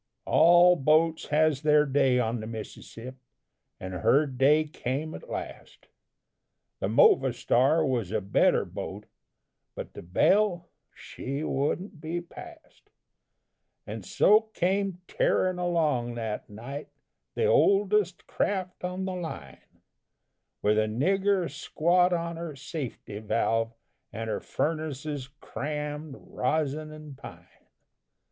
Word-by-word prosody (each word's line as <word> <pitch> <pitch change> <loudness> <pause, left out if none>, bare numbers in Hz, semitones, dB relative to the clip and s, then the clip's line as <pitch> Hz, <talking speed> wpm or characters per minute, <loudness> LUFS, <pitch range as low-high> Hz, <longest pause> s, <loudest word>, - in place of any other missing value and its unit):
All 175 +2 +6
boats 160 +2 +2
has 150 -2 +2
their 150 -1 +4
day 135 -2 +2
on 120 -1 0
the 110 - -6
Mississip'. 115 +3 -8 0.6
And 95 0 -6
her 135 - +3
day 140 +3 +3
came 150 +1 -4
at 485 - -10
last - - -8 0.9
The - - -1
Movastar 155 - +3
was 120 -8 -1
a 110 - +1
better 100 0 +2
boat, - - -7 0.7
But - - -7
the - - -9
Belle, 175 - +2 0.3
she 140 +3 -6
wouldn't 155 +5 -2
be 165 +2 -3
passed, 315 - -13 1.0
And - - -6
so 215 +2 +4
came 190 0 0
tearin' 185 -1 +1
along 150 -9 0
that 110 -2 -4
night, 130 +8 -8 0.5
The 455 - +1
oldest 205 - +3
craft 185 -3 -2
on 180 +1 -3
the 190 - -3
line, 85 - -8 0.8
With 105 +1 +3
a 110 - +1
nigger 190 - +1
squat 175 +5 +1
on 170 -1 -2
her 165 -3 -6
safety 135 - -6
valve, 115 +1 0 0.4
And 115 0 -4
her - - -2
furnaces 150 -3 -3
crammed, 150 0 -5
rosin 155 +3 -2
and 155 -2 -10
pine. 135 - -12
155 Hz, 115 wpm, -27 LUFS, 130-175 Hz, 1.0 s, All